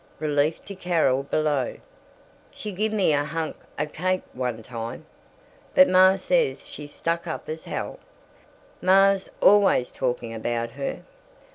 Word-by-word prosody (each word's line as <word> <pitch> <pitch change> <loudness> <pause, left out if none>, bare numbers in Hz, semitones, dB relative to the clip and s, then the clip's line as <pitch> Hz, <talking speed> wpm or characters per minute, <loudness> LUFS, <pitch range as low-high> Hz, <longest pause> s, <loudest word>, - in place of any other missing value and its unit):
Relief 150 +1 0
to 200 - -7
Carol, 165 -8 +1
below. 145 -2 0 0.7
"She 210 - -6
gimme 205 -3 +1
a 145 0 +2
hunk 160 +1 -3 0.2
o' 150 - 0
cake, 185 +5 -1
one 125 -3 -3
time. 115 -1 -6 0.7
But 275 0 +8
Ma 185 +1 +6
says - - 0
she's 145 -1 -8
stuck 170 +2 -2
up 160 - -5
as 160 +1 -6
hell. - - -5 0.8
Ma's 195 +1 +4
always 200 -11 +5
talking 120 -3 -2
about 115 +1 -2
her. 135 +3 -5
155 Hz, 130 wpm, -25 LUFS, 130-185 Hz, 0.8 s, But